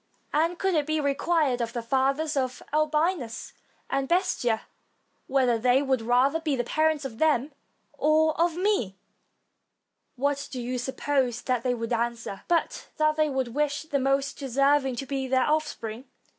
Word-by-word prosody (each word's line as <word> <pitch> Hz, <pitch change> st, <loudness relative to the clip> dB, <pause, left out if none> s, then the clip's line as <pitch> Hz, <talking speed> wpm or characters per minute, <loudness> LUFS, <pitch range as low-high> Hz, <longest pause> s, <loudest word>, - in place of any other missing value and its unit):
And 330 Hz, +4 st, +1 dB
could 385 Hz, 0 st, 0 dB
it 300 Hz, -3 st, +1 dB
be 310 Hz, 0 st, 0 dB
required 285 Hz, -2 st, +1 dB
of 235 Hz, 0 st, -3 dB
the 235 Hz, -2 st, -3 dB
fathers 275 Hz, +5 st, +1 dB
of 255 Hz, -2 st, -2 dB
Albinus 305 Hz, -4 st, 0 dB, 0.3 s
and 270 Hz, 0 st, -1 dB
Bestia, 265 Hz, -, +1 dB, 0.7 s
whether 255 Hz, -4 st, +2 dB
they 250 Hz, +4 st, +3 dB
would 265 Hz, -3 st, +1 dB
rather 250 Hz, +7 st, +2 dB
be 310 Hz, -4 st, -1 dB
the 245 Hz, -, -1 dB
parents 310 Hz, +2 st, +1 dB
of 225 Hz, -4 st, -7 dB
them 305 Hz, -3 st, +2 dB, 0.4 s
or 315 Hz, +1 st, +3 dB
of 340 Hz, -1 st, +2 dB
me, 360 Hz, -, 0 dB, 1.2 s
what 280 Hz, +2 st, -1 dB
do 260 Hz, -, -6 dB
you 250 Hz, +1 st, -3 dB
suppose 260 Hz, -1 st, -1 dB
that 250 Hz, -2 st, 0 dB
they 245 Hz, 0 st, 0 dB
would 230 Hz, 0 st, -3 dB
answer, 235 Hz, -4 st, -2 dB
but 340 Hz, -1 st, 0 dB
that 305 Hz, 0 st, +2 dB
they 310 Hz, -1 st, +2 dB
would 265 Hz, -3 st, -1 dB
wish 290 Hz, +3 st, -1 dB
the 290 Hz, -3 st, -1 dB
most 275 Hz, +1 st, 0 dB
deserving 275 Hz, 0 st, +2 dB
to 270 Hz, -, -4 dB
be 270 Hz, -1 st, -3 dB
their 260 Hz, 0 st, +2 dB
offspring? 275 Hz, -6 st, -2 dB
275 Hz, 160 wpm, -26 LUFS, 245-310 Hz, 1.2 s, they